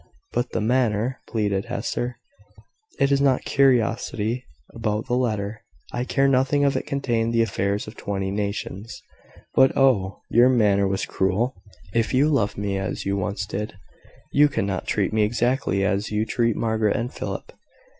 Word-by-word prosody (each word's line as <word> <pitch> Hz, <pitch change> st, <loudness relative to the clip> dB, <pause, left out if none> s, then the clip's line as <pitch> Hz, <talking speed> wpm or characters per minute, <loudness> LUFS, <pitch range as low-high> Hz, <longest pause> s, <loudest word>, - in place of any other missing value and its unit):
"But 120 Hz, 0 st, 0 dB
the -, -, -2 dB
manner," 120 Hz, +1 st, +1 dB
pleaded 100 Hz, -3 st, 0 dB
Hester. 120 Hz, 0 st, -3 dB, 0.8 s
"It 140 Hz, 0 st, +3 dB
is 140 Hz, 0 st, +3 dB
not 135 Hz, -2 st, +2 dB
curiosity 120 Hz, -3 st, +1 dB, 0.3 s
about 110 Hz, -1 st, -2 dB
the -, -, -3 dB
letter. 110 Hz, -4 st, -1 dB, 0.3 s
I 120 Hz, +1 st, -1 dB
care 135 Hz, +1 st, +2 dB
nothing 135 Hz, +2 st, +3 dB
if 140 Hz, -1 st, +2 dB
it -, -, -2 dB
contained 115 Hz, -4 st, 0 dB
the 115 Hz, -, +4 dB
affairs 100 Hz, -1 st, -1 dB
of 110 Hz, -, -10 dB
twenty 95 Hz, -1 st, -3 dB
nations. 100 Hz, +1 st, -4 dB, 0.5 s
But, 130 Hz, -, +4 dB
oh! 110 Hz, -8 st, +2 dB
your 120 Hz, +2 st, +6 dB
manner 105 Hz, -5 st, +3 dB
was 95 Hz, 0 st, -1 dB
cruel. 100 Hz, +7 st, 0 dB, 0.4 s
If 115 Hz, +1 st, +1 dB
you 140 Hz, +4 st, +4 dB
loved 115 Hz, -9 st, +1 dB
me 100 Hz, -1 st, -1 dB
as 95 Hz, -, -4 dB
you 100 Hz, 0 st, 0 dB
once 100 Hz, +1 st, -2 dB
did, 105 Hz, +1 st, -4 dB, 0.6 s
you 150 Hz, +1 st, +6 dB
could 135 Hz, -, -1 dB
not 95 Hz, -2 st, -3 dB
treat -, -, 0 dB
me 110 Hz, -, +2 dB
exactly 115 Hz, -2 st, +1 dB
as 100 Hz, +2 st, 0 dB
you 105 Hz, +1 st, 0 dB
treat 115 Hz, -1 st, +1 dB
Margaret 110 Hz, -2 st, +1 dB
and 120 Hz, +3 st, -2 dB
Philip. -, -, -5 dB
110 Hz, 165 wpm, -24 LUFS, 100-125 Hz, 0.8 s, your